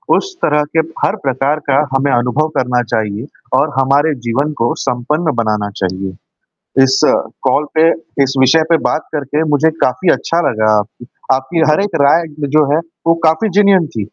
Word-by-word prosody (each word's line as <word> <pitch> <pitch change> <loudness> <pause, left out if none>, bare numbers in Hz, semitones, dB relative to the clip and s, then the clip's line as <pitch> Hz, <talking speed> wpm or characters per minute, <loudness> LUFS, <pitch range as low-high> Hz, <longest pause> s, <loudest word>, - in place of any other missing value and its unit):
उस 390 -1 -3
तरह 150 0 +2
के 160 - +4 0.3
हर 200 - 0
प्रकार 135 +3 0
का 135 - +3 0.2
हमें 140 +1 +1
अनुभव 125 +5 +1
करना 125 -1 +1
चाहिए 110 +1 -3 0.3
और 150 - +1
हमारे 140 +4 +2
जीवन 140 +6 0
को 120 - +1
संपन्न 150 +6 -1
बनाना 105 -3 -1
चाहिए। 95 +1 -3 0.7
इस 135 0 +3 0.4
कॉल 150 - +1
पे 160 - +5 0.3
इस 135 0 0
विषय 155 +5 +4
पे 165 - +5
बात 155 - -2
करके 150 +1 -2
मुझे 160 +3 +3
काफ़ी 165 +8 +1
अच्छा 170 +1 -1
लगा 110 -3 +1
आपकी 110 +3 -6 0.3
आपकी 135 +6 -1
हर 150 - +3
एक 205 -4 -4
राय 160 +4 +4 0.3
जो 155 - +5
है - - +3 0.3
वो 165 - +4
काफ़ी 160 +8 +2
जिनियन 195 -4 +4
थी। 120 - -9
140 Hz, 170 wpm, -15 LUFS, 120-160 Hz, 0.7 s, पे